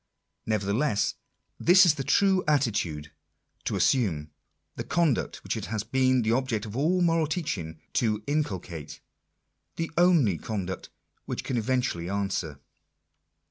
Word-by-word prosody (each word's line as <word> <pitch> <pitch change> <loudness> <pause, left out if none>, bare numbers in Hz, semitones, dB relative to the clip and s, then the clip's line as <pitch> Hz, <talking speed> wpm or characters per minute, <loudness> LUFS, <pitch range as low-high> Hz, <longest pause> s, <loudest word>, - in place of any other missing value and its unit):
Nevertheless, 105 +3 +1 0.5
this 185 +2 +7
is 170 - +5
the 140 -3 -4
true 190 +6 +3
attitude 100 - 0 0.5
to - - -1
assume: 80 - +1 0.4
the - - -4
conduct 165 -8 0
which - - -2
it - - -4
has 110 -2 -3
been 130 +1 +2
the 110 - +1
object 120 -3 0
of 105 0 -8
all 165 +7 +2
moral 165 -2 +2
teaching 100 - -3
to 110 -3 0
inculcate; 95 - -3 0.8
the 165 0 -3
only 160 - +4
conduct 100 -6 -4 0.4
which - - -4
can 130 - -3
eventually 115 -7 -1
answer 100 -4 -1
a 70 - -22
120 Hz, 135 wpm, -27 LUFS, 100-150 Hz, 0.8 s, this